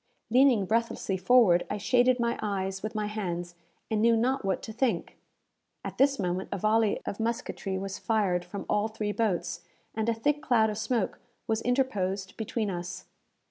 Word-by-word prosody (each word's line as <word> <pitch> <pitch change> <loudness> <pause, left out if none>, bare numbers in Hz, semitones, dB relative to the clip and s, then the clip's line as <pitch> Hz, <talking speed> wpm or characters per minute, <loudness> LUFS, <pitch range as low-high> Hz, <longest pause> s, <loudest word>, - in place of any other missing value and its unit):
Leaning 250 -5 +5
breathlessly 225 -2 0
forward, 190 -2 +5
I 205 - -2
shaded 245 +4 +3
my 235 0 0
eyes 195 -2 -2
with 215 +1 -5
my 215 -1 -1
hands, 175 -5 -4 0.4
and 215 -1 +1
knew 230 0 +5
not 260 +3 +1
what 195 -1 -1
to 220 - -7
think. 225 -7 -1 0.7
At - - -6
this 275 +1 +4
moment 185 0 -2
a - - -1
volley 215 +2 +2
of 200 - -4
musketry 225 -4 -2
was 195 0 -5
fired 200 -6 +1
from 180 +3 -7
all 210 +1 +1
three 215 -1 -3
boats, 175 -6 -1 0.3
and 220 +1 -1
a - - +3
thick 295 +6 0
cloud 225 -7 +3
of 210 - -5
smoke 225 -2 -1 0.3
was 220 0 0
interposed 205 -7 -1
between 220 -1 -2
us. 175 0 -6
215 Hz, 175 wpm, -28 LUFS, 190-235 Hz, 0.7 s, Leaning